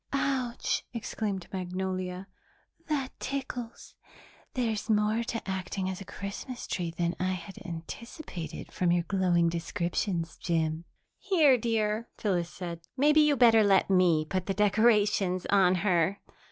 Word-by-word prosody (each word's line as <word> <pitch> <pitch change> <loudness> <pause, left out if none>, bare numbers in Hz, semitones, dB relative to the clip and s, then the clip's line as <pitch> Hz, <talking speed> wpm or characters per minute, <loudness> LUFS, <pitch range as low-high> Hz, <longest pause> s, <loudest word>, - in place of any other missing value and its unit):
"Ouch," 265 -3 0
exclaimed 210 -4 -3
Magnolia, 185 0 -3 0.6
"that 280 -4 -1
tickles! 255 -3 -5 0.6
There's 225 -4 -1
more 215 +2 +2
to 230 -2 -4
acting 190 0 -3
as 185 - -7
a - - -7
Christmas 200 +7 -6
tree 175 -2 -2
than 170 +1 -1
I 185 0 0
had 185 +4 -8
anticipated 170 - -7
from 180 -1 +1
your 175 0 +2
glowing 180 -2 +2
descriptions, 170 +1 -2
Jim." 160 -1 -1 0.3
"Here, 325 -9 +5
dear," 225 -1 0
Phyllis 175 -5 0
said, 175 -2 -6 0.2
"maybe 300 +3 +5
you'd 300 -2 +4
better 225 -2 +6
let 195 -1 +4
me 175 -4 +4
put 185 +2 -2
the 195 - -1
decorations 210 -2 +3
on 190 -2 +5
her." 180 0 +2
195 Hz, 130 wpm, -29 LUFS, 175-230 Hz, 0.6 s, better